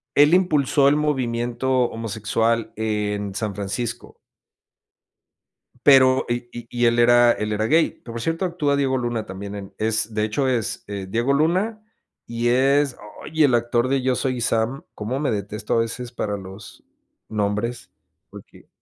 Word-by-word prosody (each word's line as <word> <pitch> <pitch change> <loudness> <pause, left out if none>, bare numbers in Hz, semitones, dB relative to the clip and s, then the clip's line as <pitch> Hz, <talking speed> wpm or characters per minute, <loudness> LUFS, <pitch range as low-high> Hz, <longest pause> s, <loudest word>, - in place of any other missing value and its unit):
él 145 +3 +6
impulsó 150 -6 +3
el 145 - +2
movimiento 130 -3 -1 0.2
homosexual 115 +1 -1
en 105 -2 -2
San 100 0 -3
Francisco. 115 +4 -5 1.7
Pero, 130 -2 +6
y 120 0 -3
y 120 -1 -9
y 120 0 +1
él 115 0 +2
era 120 0 +6
él 105 -1 -2
era 110 +1 0
gay, 160 +4 +2
que 115 - -9
por 115 - -5
cierto, 165 +8 -2
actúa 170 -6 0
Diego 135 -2 +1
Luna 120 -3 -3
también 100 +2 -7
en 100 -1 -8
es, 110 0 -1
de 105 - +1
hecho 110 +6 0
es, 120 -5 -1
eh, 100 -2 -5
Diego 115 +7 0
Luna 180 +10 +1 0.5
y 115 0 -2
es, 135 +2 +2 0.3
¡ay!, 160 0 +1
el 140 -4 +4
actor 120 +1 +1
de 135 0 +1
Yo 130 0 +1
Soy 130 -2 -2
Sam, 115 +3 0
como 115 +6 -3
me 150 - 0
detesto 105 0 -3
a - - +3
veces 120 +2 -5
para 105 -4 -3
los 95 +1 -11 0.5
nombres, 105 +3 -2 0.4
porque - - -14
120 Hz, 160 wpm, -22 LUFS, 110-135 Hz, 1.7 s, él